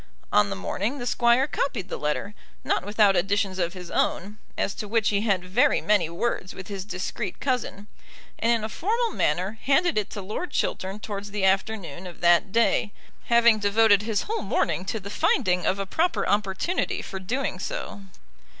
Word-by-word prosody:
On 105 -1 +4
the 100 - -3
morning 200 - -2
the 245 - -5
Squire 240 +1 +3
copied 275 -9 -2
the - - -4
letter, 150 +7 -2 0.3
not - - 0
without 205 0 +3
additions 195 +1 0
of 170 0 0
his 180 -2 -9
own, 205 +4 -1 0.2
as 200 - 0
to 210 - -6
which 220 0 +2
he 200 -1 +1
had 195 -5 0
very 190 +7 +3
many 205 -6 +2
words 185 +1 -3
with 190 - -9
his 195 -2 -4
discreet 185 +1 -4
cousin, 250 -6 -2 0.5
and 230 - +2
in 230 -2 +1
a - - -1
formal 455 - -1
manner 195 - -1
handed 285 -1 +2
it 210 - -4
to 205 - -6
Lord 215 - -4
Chiltern 190 +2 -2
towards 205 -1 -5
the 200 -1 -1
afternoon 190 -3 -1
of 175 - -11
that 175 +3 +4
day, 230 -1 +2 0.3
having 235 -2 +5
devoted 205 0 +4
his 215 -1 -1
whole 445 +1 -3
morning 185 - 0
to 220 +3 -2
the 200 0 -8
finding 180 -3 +1
of 190 - +2
a 195 - -2
proper 330 - 0
opportunity 205 - 0
for 190 - -6
doing 250 +9 -2
so. - - -5
205 Hz, 185 wpm, -25 LUFS, 190-230 Hz, 0.5 s, having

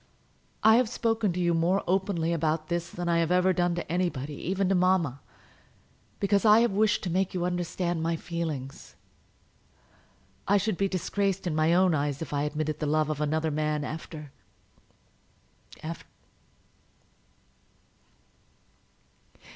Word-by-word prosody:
I 220 +1 +7
have 250 -3 +2
spoken 225 -4 0
to 180 - -3
you 175 -1 +2
more 170 +4 +1
openly 180 -3 0
about 155 -1 -1
this 170 0 -2
than 175 0 -5
I 170 0 +2
have 165 0 0
ever 180 +1 +3
done 175 -1 +1
to 175 - -4
anybody, 170 -6 -1
even 190 +6 -1
to - - +3
mamma, 180 -7 +2 1.0
because 200 0 +2
I 215 +1 +7
have 235 -2 +2
wished 210 +2 +2
to 180 - -2
make 190 +1 0
you 175 -1 0
understand 175 -1 -2
my 165 +1 0
feelings. 160 -6 -5 1.5
I 205 - +4
should 210 +1 0
be 195 +2 +1
disgraced 195 +1 -1
in 175 - -1
my 155 +2 +3
own 185 -1 +4
eyes 145 -2 -1
if 160 -3 -6
I 145 0 0
admitted 155 0 -2
the 150 - -2
love 155 +1 +1
of 150 -1 -4
another 155 +1 0
man, 150 0 -1
after 155 -1 -7 1.5
after 165 +2 -6
170 Hz, 145 wpm, -27 LUFS, 155-190 Hz, 1.5 s, I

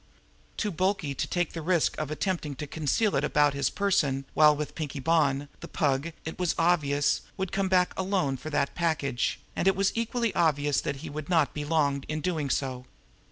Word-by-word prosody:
Too 210 - -1
bulky 185 -4 0
to - - -2
take 175 -2 -1
the 165 - -5
risk 170 0 +1
of 155 -2 -3
attempting 155 -2 -2
to 150 - -5
conceal 160 +8 0
it 135 - +1
about 150 -1 +3
his 140 -2 0
person 145 -9 +1
while 150 -1 +6
with 150 0 -4
Pinkie 150 -3 -5
Bonn, 145 -1 +2
the 170 - -8
Pug, 145 0 0
it 160 +3 -6
was 180 -2 +1
obvious, 150 -4 +2 0.2
would 190 -2 -3
come 195 -1 0
back 180 -1 +3
alone 185 -8 0
for 145 +4 -7
that 145 -2 0
package, 155 -7 -1 0.2
and 185 - 0
it 195 - +4
was 195 0 +2
equally 230 -1 -1
obvious 145 -4 +2
that 140 - -2
he - - -5
would 155 +1 -6
not 160 -6 +2
be 150 - -4
long 145 -3 +1
in 155 0 -2
doing 155 -3 -1
so. 130 -2 -2
155 Hz, 200 wpm, -28 LUFS, 140-180 Hz, 0.2 s, while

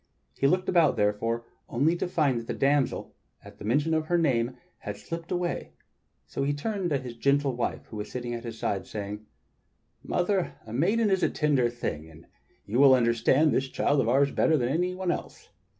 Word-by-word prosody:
He 135 - +4
looked 185 +5 +1
about, 170 -4 +4
therefore, 115 +3 0 0.2
only 145 +8 +2
to 180 - -2
find 150 -8 +1
that 115 - -9
the - - -3
damsel, 140 0 +1 0.3
at - - -14
mention 145 +9 +1
of 160 0 0
her 175 - +2
name, 125 -6 +1 0.2
had - - -6
slipped 165 0 -7
away; 175 -1 -2 0.5
so - - -5
he 140 +1 +1
turned 190 +5 -2
to 145 - +1
his 125 -3 -7
gentle 140 +1 +1
wife 120 - -3
who 110 - -9
was 105 - -5
sitting 120 -1 -4
at 115 -1 -5
his 115 -2 -6
side, 100 -3 -2
saying: 105 0 -6 0.7
"Mother, 180 +1 0
a 110 - -9
maiden 205 - +2
is 190 -1 +2
a - - +3
tender 140 -6 +2
thing, 80 -10 -5
and 80 +1 -15 0.4
you 115 +5 -1
will 135 -2 +8
understand 125 +5 +3
this 135 +1 0
child 145 +1 +1
of 115 - 0
ours 140 +3 +3
better 160 - +3
than 120 -3 0
any 180 +5 0
one 185 -1 -1
else. - - -6
140 Hz, 200 wpm, -27 LUFS, 115-165 Hz, 0.7 s, will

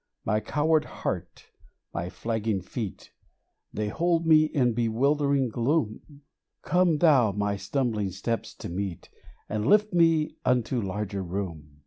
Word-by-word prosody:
My 105 -1 +2
coward 155 +6 +1
heart, 90 -2 -5 0.4
my 85 +1 -3
flagging 110 -1 -2
feet, 105 0 -6 0.6
They 105 -1 -2
hold 170 +6 +1
me 155 -1 +6
in 125 -6 +1
bewildering 135 +4 +1
gloom: 140 +3 -2 0.4
Come 180 -3 +3
Thou 140 - +4
my 105 0 -1
stumbling 105 0 -1
steps 110 +5 -4
to - - -7
meet, 90 -1 -5 0.4
And 105 +1 -2
lift 210 -1 +4
me 165 -3 +3
unto 125 0 +1
larger 100 0 -3
room 85 -6 -5
115 Hz, 125 wpm, -27 LUFS, 100-150 Hz, 0.6 s, me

